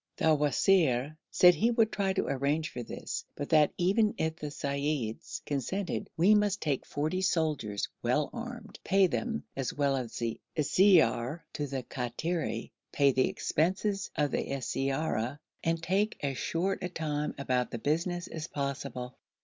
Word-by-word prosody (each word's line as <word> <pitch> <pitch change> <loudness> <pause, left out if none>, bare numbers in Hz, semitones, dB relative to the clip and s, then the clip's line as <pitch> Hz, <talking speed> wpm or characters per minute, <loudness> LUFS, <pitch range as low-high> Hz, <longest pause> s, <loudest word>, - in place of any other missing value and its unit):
The 160 - +4
wazir 150 -2 +3
said 180 0 +7
he 200 +9 +2
would 225 -2 +3
try 195 -1 0
to 190 - 0
arrange 140 +4 0
for 125 - -5
this, 120 - -5
but 145 - -5
that, 155 -2 +5
even 205 +4 +2
if 160 0 -1
the 150 - -6
seyyids 140 -5 -3
consented, 170 +8 -2
we 185 +6 +6
must 205 -1 +2
take 145 -8 -1
forty 155 +6 -1
soldiers, 150 - 0
well 140 +5 +1
armed, 240 0 -7
pay 195 0 +4
them 225 +5 -2
as 135 -2 -2
well 140 -1 +2
as 125 -4 -4 0.4
siyar 155 - +4
to 145 - -2
the 135 -1 -3
Kattiri, 135 +9 -3 0.2
pay 140 -1 +4
the 130 0 +2
expenses 195 +4 0
of 150 -2 +1
the - - 0 0.2
siyara, 135 -1 -1 0.3
and 165 0 0
take 200 +5 +1
as 135 -1 -1
short 180 +8 -1
a 180 - -2
time 150 -3 -2
about 125 -3 0
the - - -4
business 170 +7 -1
as 160 0 -6
possible. 140 -3 -4
150 Hz, 155 wpm, -30 LUFS, 135-185 Hz, 0.4 s, said